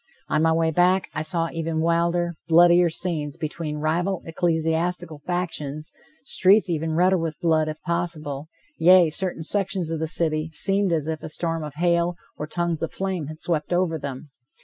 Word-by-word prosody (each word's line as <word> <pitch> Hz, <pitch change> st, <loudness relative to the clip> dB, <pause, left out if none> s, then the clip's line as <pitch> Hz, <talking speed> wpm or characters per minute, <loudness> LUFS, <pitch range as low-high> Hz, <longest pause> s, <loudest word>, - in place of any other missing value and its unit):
On 155 Hz, -, +2 dB
my 160 Hz, 0 st, +4 dB
way 160 Hz, 0 st, +2 dB
back, 180 Hz, +3 st, +2 dB
I 155 Hz, -, -2 dB
saw 165 Hz, +1 st, -2 dB
even 165 Hz, -1 st, -2 dB
wilder, 170 Hz, +1 st, +1 dB
bloodier 175 Hz, +1 st, +6 dB
scenes, 155 Hz, -3 st, -3 dB
between 155 Hz, -1 st, -4 dB
rival 170 Hz, +5 st, -1 dB
ecclesiastical 165 Hz, -1 st, -1 dB
factions, 155 Hz, -4 st, -3 dB, 0.3 s
streets 200 Hz, -6 st, +4 dB
even 160 Hz, 0 st, -1 dB
redder 180 Hz, +2 st, +3 dB
with 165 Hz, -2 st, -4 dB
blood, 160 Hz, -3 st, +2 dB
if 155 Hz, 0 st, -5 dB
possible, 160 Hz, -4 st, -3 dB, 0.3 s
yea, 175 Hz, -1 st, +6 dB
certain 175 Hz, 0 st, -3 dB
sections 190 Hz, -2 st, -1 dB
of 165 Hz, -, -2 dB
the 160 Hz, -, -1 dB
city 155 Hz, -1 st, -1 dB
seemed 195 Hz, +2 st, +1 dB
as 155 Hz, -3 st, 0 dB
if 160 Hz, -1 st, -3 dB
a -, -, -7 dB
storm 165 Hz, 0 st, -2 dB
of 150 Hz, -2 st, -7 dB
hail, 170 Hz, +1 st, +1 dB, 0.2 s
or 150 Hz, -, -5 dB
tongues 170 Hz, 0 st, -2 dB
of 165 Hz, -, -2 dB
flame 190 Hz, -6 st, -3 dB
had 155 Hz, +1 st, -8 dB
swept 160 Hz, -2 st, -2 dB
over 175 Hz, -2 st, +1 dB
them. 140 Hz, +1 st, -7 dB
165 Hz, 170 wpm, -24 LUFS, 155-175 Hz, 0.3 s, bloodier